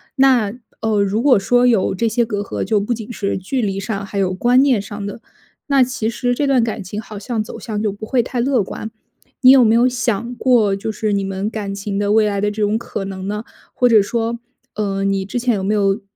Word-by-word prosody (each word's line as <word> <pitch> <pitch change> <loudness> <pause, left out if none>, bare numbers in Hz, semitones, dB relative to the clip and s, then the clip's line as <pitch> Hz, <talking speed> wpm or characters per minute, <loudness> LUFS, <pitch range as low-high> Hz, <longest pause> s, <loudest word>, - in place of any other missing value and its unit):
那， 255 -6 +3 0.3
呃， 220 -2 +1
如 205 +3 0
果 265 -5 +5
说 245 +5 +3
有 225 -7 +2
这 230 +4 0
些 235 +2 +1
隔 210 -3 -3
阂， 205 - -4
就 215 -2 +1
不 210 +4 -1
仅 225 +1 -7
是 200 -2 -2
距 240 +8 -2
离 195 -2 -2
上 200 0 -4
还 200 - -7
有 185 -1 +1
观 245 +7 +3
念 255 -8 +3
上 205 0 -7
的， 205 +3 -7 0.5
那 275 -2 +4
其 245 -3 -2
实 245 +1 -1
这 285 +3 0
段 260 -4 +3
感 220 -2 -3
情 205 +3 -6
好 215 -2 -8
像 225 0 -2
走 - - -9
向 210 -3 -4
就 210 - +1
不 205 +2 -8
会 250 -3 +2
太 245 0 -4
乐 250 -4 +2
观。 220 +3 -6 0.5
你 255 -1 +8
有 265 -2 +7
没 225 0 +4
有 240 +2 +4
想 240 -1 -1
过 230 -6 +3
就 200 +3 -4
是 215 -1 -2
你 200 - 0
们 195 +1 -3
感 200 -2 -4
情 200 0 -3
的 205 0 0
未 220 -1 +4
来 200 -1 -1
的 205 - +1
这 210 0 -2
种 205 +1 +1
可 215 -4 -5
能 190 0 -6
呢？ 210 +1 -3 0.3
或 250 - +3
者 225 -4 +6
说， 230 +2 -2 0.3
呃， 195 -2 -2
你 195 -1 0
之 200 +5 -5
前 245 0 +1
有 190 - -3
没 200 - 0
有 200 +1 +1
215 Hz, 265 characters per minute, -19 LUFS, 200-240 Hz, 0.5 s, 你